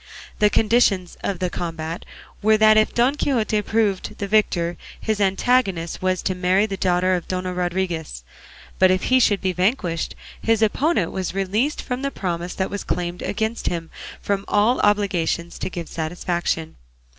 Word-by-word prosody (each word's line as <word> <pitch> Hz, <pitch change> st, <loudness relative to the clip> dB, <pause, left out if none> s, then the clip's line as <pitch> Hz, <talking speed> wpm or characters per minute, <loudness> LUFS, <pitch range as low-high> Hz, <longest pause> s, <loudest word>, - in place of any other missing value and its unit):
The 210 Hz, -1 st, +5 dB
conditions 210 Hz, -5 st, +2 dB
of 195 Hz, -, -1 dB
the 180 Hz, 0 st, -2 dB
combat 165 Hz, -1 st, -5 dB, 0.4 s
were 215 Hz, +1 st, +4 dB
that 215 Hz, 0 st, +6 dB
if 215 Hz, 0 st, +4 dB
Don 245 Hz, +3 st, +3 dB
Quixote 230 Hz, -7 st, 0 dB
proved 210 Hz, -2 st, -1 dB
the 200 Hz, -, -3 dB
victor 175 Hz, -5 st, +1 dB, 0.2 s
his 215 Hz, -2 st, -1 dB
antagonist 195 Hz, -3 st, +1 dB
was 185 Hz, -1 st, 0 dB
to 185 Hz, -, 0 dB
marry 185 Hz, +2 st, +2 dB
the 200 Hz, -2 st, -4 dB
daughter 185 Hz, 0 st, +2 dB
of 180 Hz, -2 st, -2 dB
Dona 185 Hz, 0 st, -2 dB
Rodriguez; 175 Hz, -, -2 dB, 0.6 s
but 185 Hz, -, +6 dB
if 185 Hz, 0 st, +1 dB
he 260 Hz, -, +7 dB
should 205 Hz, -5 st, +3 dB
be 185 Hz, -1 st, 0 dB
vanquished 180 Hz, -2 st, 0 dB, 0.3 s
his 225 Hz, -1 st, +2 dB
opponent 220 Hz, -, +1 dB
was 185 Hz, -1 st, -3 dB
released 210 Hz, +9 st, 0 dB
from 250 Hz, 0 st, -3 dB
the 275 Hz, -, -1 dB
promise 175 Hz, -6 st, -4 dB
that 190 Hz, -, -2 dB
was 205 Hz, -1 st, -4 dB
claimed 175 Hz, 0 st, -3 dB
against 220 Hz, +2 st, -2 dB
him 165 Hz, -2 st, -3 dB, 0.2 s
and -, -, -24 dB
from 200 Hz, -1 st, 0 dB
all 210 Hz, +5 st, +3 dB
obligations 180 Hz, -5 st, 0 dB
to -, -, -3 dB
give 170 Hz, -3 st, -6 dB
satisfaction. 165 Hz, 0 st, -3 dB
190 Hz, 170 wpm, -22 LUFS, 175-215 Hz, 0.6 s, he